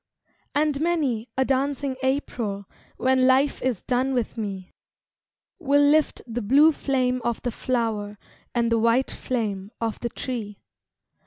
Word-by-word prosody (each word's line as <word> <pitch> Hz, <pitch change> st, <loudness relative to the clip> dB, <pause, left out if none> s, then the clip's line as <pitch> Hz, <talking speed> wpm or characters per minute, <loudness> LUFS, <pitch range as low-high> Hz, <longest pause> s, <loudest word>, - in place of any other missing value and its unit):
And 295 Hz, -1 st, +1 dB
many 285 Hz, -9 st, 0 dB
a 265 Hz, -, +3 dB
dancing 275 Hz, 0 st, 0 dB
April 235 Hz, -7 st, -2 dB, 0.3 s
When 260 Hz, 0 st, +3 dB
life 270 Hz, +2 st, +3 dB
is 250 Hz, -6 st, -1 dB
done 260 Hz, +1 st, 0 dB
with 240 Hz, -3 st, -1 dB
me, 195 Hz, -5 st, -5 dB, 0.9 s
Will 285 Hz, -3 st, +3 dB
lift 300 Hz, +2 st, +3 dB
the 240 Hz, 0 st, -4 dB
blue 280 Hz, +9 st, +6 dB
flame 255 Hz, -4 st, 0 dB
of 235 Hz, 0 st, -1 dB
the 245 Hz, -, -1 dB
flower 220 Hz, -4 st, -2 dB, 0.4 s
And 235 Hz, -1 st, +1 dB
the 230 Hz, -, +3 dB
white 230 Hz, +4 st, +2 dB
flame 205 Hz, -6 st, -3 dB
of 225 Hz, -1 st, -2 dB
the 235 Hz, -, -3 dB
tree. 220 Hz, -5 st, -5 dB
250 Hz, 140 wpm, -25 LUFS, 225-270 Hz, 0.9 s, blue